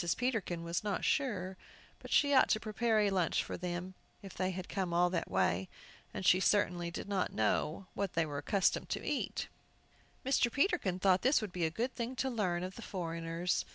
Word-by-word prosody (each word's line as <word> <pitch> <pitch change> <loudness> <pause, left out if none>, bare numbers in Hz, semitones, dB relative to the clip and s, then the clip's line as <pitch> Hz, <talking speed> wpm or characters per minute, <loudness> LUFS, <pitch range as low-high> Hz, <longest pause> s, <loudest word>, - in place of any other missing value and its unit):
Peterkin 220 -9 -1
was 170 +3 -2
not 205 -3 -1
sure 195 -10 0 0.4
but - - -11
she 285 -1 +4
ought 260 - +6
to 215 - +3
prepare 220 0 +1
a 205 -1 +2
lunch 180 -4 +1
for - - -5
them, 180 +1 -4 0.3
if 195 - -9
they 185 0 -1
had 185 -1 -5
come 185 -4 -2
all 175 +1 +4
that 175 - -2
way; 95 0 +1 0.4
but 190 - -5
she 180 - +6
certainly 180 -3 +2
did 170 - -6
not 200 -2 0
know 150 - 0
what 200 -2 -2
they 165 0 +2
were 145 -2 -4
accustomed 190 +6 +1
to - - -3
eat. - - -2 0.8
Mr. 255 -3 +3
Peterkin 285 - +1
thought 185 -1 +3
this 265 +4 +4
would 215 -5 -5
be 180 -2 -1
a - - +1
good 235 +10 -2
thing 240 +2 -4
to 265 +1 -1
learn 180 -7 0
of 185 +1 -6
the - - -7
foreigners. 170 -3 -2
185 Hz, 200 wpm, -33 LUFS, 175-220 Hz, 0.8 s, ought